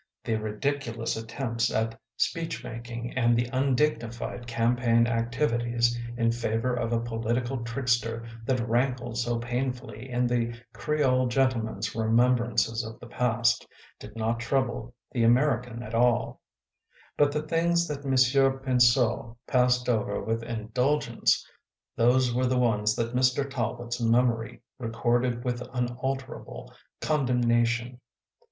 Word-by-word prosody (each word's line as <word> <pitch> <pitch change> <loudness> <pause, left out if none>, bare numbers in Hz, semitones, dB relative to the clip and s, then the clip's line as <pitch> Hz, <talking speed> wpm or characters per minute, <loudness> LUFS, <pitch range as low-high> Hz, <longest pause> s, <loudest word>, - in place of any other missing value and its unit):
The 115 - -1
ridiculous 115 +2 -2
attempts 115 +1 -2
at 115 0 -1 0.2
speechmaking 120 -7 -3
and 120 -2 +3
the 120 +1 +1
undignified 125 -3 0
campaign 115 0 +2
activities 120 0 +1 0.2
in 115 -1 +2
favor 115 +1 -1
of 120 -1 -1
a 115 - +2
political 120 +2 -2
trickster, 115 -2 -1 0.2
that 125 -2 0
rankled 120 0 0
so 120 0 0
painfully 125 0 -4
in 125 0 +1
the 120 -1 -1
Creole 130 -4 +1
gentle 130 -2 +2
man 110 - -6
s 105 +2 -3
remembrances 115 0 +2
of 110 0 -8
the - - -11
past, 120 0 +1 0.3
did 105 +1 -11
not 115 +1 -1
trouble 120 -1 -1 0.2
the 120 - 0
American 120 -1 +2
at 110 0 -8
all; 120 +1 +2 0.7
but 145 -1 +3
the 150 +1 -2
things 170 +2 +1
that 145 -1 -5
Monsieur 135 0 +3
Pinseau 120 -2 +2
passed 125 -1 +2
over 115 -4 0
with 115 +1 -2
indulgence, 115 - 0 0.5
those 125 +1 +3
were 125 +1 +1
the 130 0 +1
ones 110 -3 +2
that 115 +1 -2
Mr. 130 +2 +2
Talbot 120 -2 -3
s - - -3
memory 115 0 +1 0.2
recorded 120 +1 0
with 125 -1 -2
unalterable 130 +2 -4 0.3
con 150 -4 +1
demnation. 120 0 +1
120 Hz, 130 wpm, -27 LUFS, 115-130 Hz, 0.7 s, and